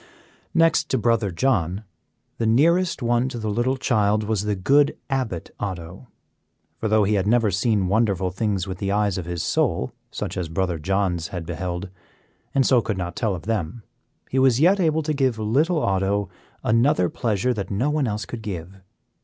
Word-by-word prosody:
Next 165 -1 +3
to 130 - +1
Brother 115 -3 +1
John, 95 -2 0 0.6
the 115 - +1
nearest 170 +6 +3
one 120 +2 +1
to 120 - -6
the 110 -2 -2
little 120 +5 0
child 105 -4 +1
was 105 -1 -1
the 105 -1 0
good 140 +10 +3
Abbot 125 -11 -2
Otto, 95 +2 -6 0.7
for 110 - -1
though 110 0 +3
he 100 +2 +1
had 100 -1 +1
never 115 -2 +3
seen 100 0 +1
wonderful 100 -3 +1
things 95 -1 -1
with 95 -2 -6
the 100 0 -1
eyes 100 -2 +1
of 90 - -5
his 85 -1 -3
soul, - - 0 0.2
such - - -5
as 90 -3 -3
Brother 85 0 -1
John's 90 -1 0
had 85 -2 -6
beheld, 90 +2 -4 0.7
and 135 -1 +4
so 125 -3 +4
could 105 -3 -3
not 85 -2 -4
tell 110 -5 0
of 85 - -8
them, 110 0 -3 0.4
he 130 - 0
was 130 -2 +4
yet 185 +6 +4
able 160 -3 +2
to 155 +1 -1
give 130 -5 +1
little 140 +11 +1
Otto 100 +1 0 0.3
another 115 -4 +3
pleasure 115 +5 0
that 100 -5 -4
no 120 +9 0
one 150 -3 +1
else 105 -1 -3
could 120 - -7
give. 95 -2 -7
105 Hz, 185 wpm, -23 LUFS, 95-125 Hz, 0.7 s, and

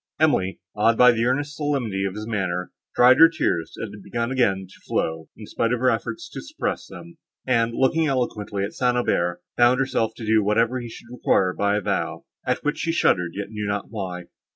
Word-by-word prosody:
Emily, 120 -12 +2 0.2
awed 115 +2 +3
by 125 0 +8
the 115 0 0
earnest 145 +4 -1
solemnity 125 -11 -1
of 95 0 -3
his 105 0 -5
manner, 95 -5 -2 0.2
dried 125 +2 +6
her 165 0 +9
tears, 85 - -1
that 115 - -6
had 105 - -11
begun 120 +4 -3
again 100 -8 +1
to 95 - -18
flow, 80 0 -2
in 110 - -9
spite 115 +2 -1
of 125 - 0
her 130 +1 +3
efforts 340 0 -3
to - - -6
suppress 305 +1 -4
them; 170 -1 -12 0.3
and, 115 -2 +1
looking 160 +4 +2
eloquently 110 -7 -2
at 100 - -4
St. 125 -1 +1
Aubert, 90 -7 0
bound 120 +1 +5
herself 115 -4 0
to 115 - -7
do 110 0 +3
whatever 115 +5 +2
he 120 -1 -7
should 120 +1 -12
require 95 -6 +1
by 100 +1 +1
a - - -1
vow, - - -2 0.2
at - - 0
which 150 +1 -1
she 165 - 0
shuddered, 90 - +2
yet 100 +1 -5
knew 105 -1 -4
not 100 0 -3
why. 95 -5 -5
115 Hz, 210 wpm, -23 LUFS, 100-130 Hz, 0.3 s, her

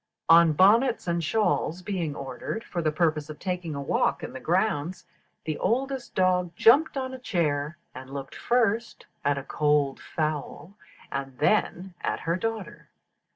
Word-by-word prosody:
On 165 -1 +7
bonnets 225 - +4
and 170 -1 0
shawls 170 -2 0
being 175 -7 -2
ordered 135 - -5
for 175 - -4
the 155 -1 +1
purpose 155 -2 0
of 155 - -7
taking 180 -3 -3
a 140 - -4
walk - - 0
in - - -6
the - - -6
grounds, 170 +5 0 0.4
the 155 -1 -3
oldest 260 +3 -1
dog 180 -2 +2
jumped 275 - +5
on 260 -1 -3
a 260 - -7
chair, 155 - -1 0.2
and 130 +1 -10
looked 135 0 -7
first 235 -1 0 0.2
at 145 0 +1
a 140 - -4
cold 145 -1 +1
fowl, 155 +3 -4 0.4
and 135 -2 -4
then 185 +2 +1
at - - -2
her 165 +1 0
daughter. 220 -2 -5
170 Hz, 155 wpm, -26 LUFS, 150-210 Hz, 0.4 s, On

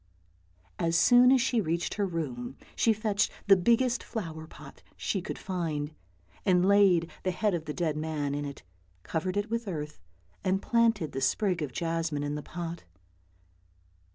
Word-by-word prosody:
As 165 0 +2
soon 245 +7 +7
as 265 -2 +5
she 235 -1 +2
reached 170 -1 -1
her 205 -2 0
room 135 -7 -4 0.2
she 230 - +3
fetched 215 -1 +1
the 195 - +7
biggest 235 +6 +2
flower 160 -8 -6
pot - - -13 0.2
she 195 - -1
could 190 - -5
find, 160 -5 -3 0.5
and 180 -2 +3
laid 195 -4 +4
the 185 - -1
head 200 +3 0
of 165 -2 -2
the 150 - -4
dead 165 -4 0
man 155 -2 -2
in 145 0 -2
it, 140 -1 -7 0.4
covered 180 +4 -2
it 205 +2 -2
with 230 -1 -2
earth, 150 -4 -5 0.4
and 190 +1 +1
planted 225 - +2
the 135 - -4
sprig 180 +6 +1
of 145 -3 -3
jasmine 165 0 -2
in 145 0 -2
the 150 - -3
pot. 170 +2 -6
175 Hz, 165 wpm, -29 LUFS, 155-205 Hz, 0.5 s, soon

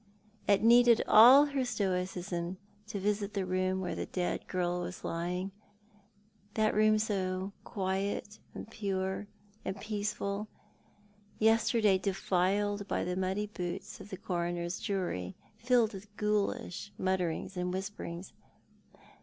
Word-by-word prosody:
It 200 0 +4
needed 235 0 +6
all 255 +7 +9
her 280 -2 -1
stoicism 185 -5 -2 0.3
to 215 -2 -4
visit 205 +1 -1
the 195 -2 0
room 185 +1 0
where 180 - -2
the - - -4
dead 180 -1 -2
girl 180 -1 -1
was 180 0 -6
lying 180 +3 -2 0.5
— 205 0 -35
that 215 -1 +2
room 215 0 +5
now - - +3
so 190 -3 -1
quiet, 195 +2 -2 0.2
and - - -7
pure, 195 -2 -2 0.4
and 195 - -4
peaceful 210 0 -3 0.5
— 205 0 -32
yesterday 225 -3 +3
defiled 200 +1 0
by - - -1
the 180 0 -2
muddy 190 +3 -1
boots 185 -2 -6
of 205 - -11
the 190 - -6
coroner's 175 -1 -2
jury, 175 - -2 0.2
filled 235 -2 +3
with 205 +2 -11
ghoulish 210 -2 -1
mutterings 185 -1 -1
and 180 0 -1
whisperings. 190 -2 -5
195 Hz, 130 wpm, -31 LUFS, 185-210 Hz, 0.5 s, all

